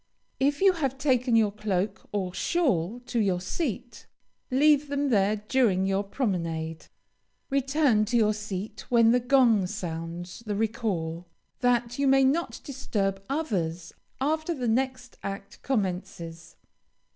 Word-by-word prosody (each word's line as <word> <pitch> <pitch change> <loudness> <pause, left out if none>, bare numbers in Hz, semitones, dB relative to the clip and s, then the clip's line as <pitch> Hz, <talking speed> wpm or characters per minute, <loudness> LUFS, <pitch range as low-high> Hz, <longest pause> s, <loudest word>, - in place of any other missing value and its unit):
If 285 +3 +1
you 385 -1 +6
have 275 -6 -2
taken 255 -3 +2
your 220 -2 +4
cloak 200 -2 -2
or 190 -3 -2
shawl 240 - 0
to 245 -1 -2
your 190 -4 +1
seat, 245 - -4 0.4
leave 290 +2 +4
them 285 0 0
there 205 -2 +3
during 210 -3 +1
your 195 +1 +1
promenade. 165 - -3 0.6
Return 275 -5 +2
to 240 +3 +1
your 215 -2 +3
seat 210 0 -6
when 230 -2 +5
the 250 - +4
gong 240 -6 +4
sounds 175 -2 -5
the 205 - -1
recall, 195 -7 -2 0.3
that 245 0 +1
you 280 - +2
may 270 0 +5
not 295 +6 0
disturb 195 -8 -2
others 180 - -2 0.3
after 315 +4 0
the 250 -4 -2
next 255 +1 -1
act 195 0 -7
commences. 180 -7 -3
225 Hz, 135 wpm, -27 LUFS, 190-265 Hz, 0.6 s, you